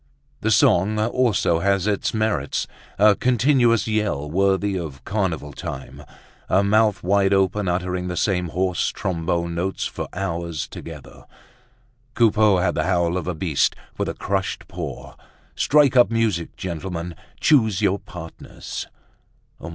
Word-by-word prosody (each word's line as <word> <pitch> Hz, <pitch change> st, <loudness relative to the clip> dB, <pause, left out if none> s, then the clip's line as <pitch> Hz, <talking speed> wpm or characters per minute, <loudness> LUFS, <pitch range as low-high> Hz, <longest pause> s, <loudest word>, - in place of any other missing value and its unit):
The -, -, -1 dB
song 100 Hz, +5 st, +3 dB
also 110 Hz, -6 st, +1 dB
has 100 Hz, 0 st, +1 dB
its 105 Hz, -2 st, 0 dB
merits, 110 Hz, -11 st, -1 dB, 0.3 s
a 105 Hz, +1 st, +6 dB
continuous 120 Hz, -1 st, +3 dB
yell 105 Hz, -10 st, -1 dB
worthy 95 Hz, +2 st, +1 dB
of 75 Hz, -8 st, -6 dB
carnival 85 Hz, -8 st, -2 dB
time, 65 Hz, -, -7 dB, 0.5 s
a 95 Hz, +2 st, +3 dB
mouth 105 Hz, 0 st, +2 dB
wide 100 Hz, +1 st, +3 dB
open 95 Hz, +1 st, +1 dB
uttering 90 Hz, 0 st, -1 dB
the 90 Hz, -1 st, -4 dB
same 90 Hz, -2 st, 0 dB
hoarse 90 Hz, +2 st, 0 dB
trombone 85 Hz, -1 st, -2 dB
notes 90 Hz, +3 st, -2 dB
for -, -, -5 dB
hours 85 Hz, -4 st, -3 dB
together. 80 Hz, -4 st, -11 dB, 0.9 s
Coupeau 110 Hz, -3 st, +4 dB
had 90 Hz, -1 st, +1 dB
the -, -, -1 dB
howl 85 Hz, -2 st, +1 dB
of 90 Hz, -2 st, -3 dB
a 90 Hz, -, -2 dB
beast 80 Hz, -3 st, +1 dB, 0.2 s
with -, -, 0 dB
a -, -, -5 dB
crushed 95 Hz, -1 st, -3 dB
paw. -, -, -7 dB, 0.4 s
Strike 145 Hz, -2 st, +3 dB
up, 125 Hz, -1 st, +6 dB
music! 110 Hz, -7 st, -1 dB
Gentlemen, 85 Hz, -1 st, -5 dB, 0.3 s
choose 110 Hz, -, +3 dB
your 100 Hz, +2 st, +2 dB
partners! 80 Hz, -2 st, -8 dB
95 Hz, 135 wpm, -22 LUFS, 85-105 Hz, 0.9 s, a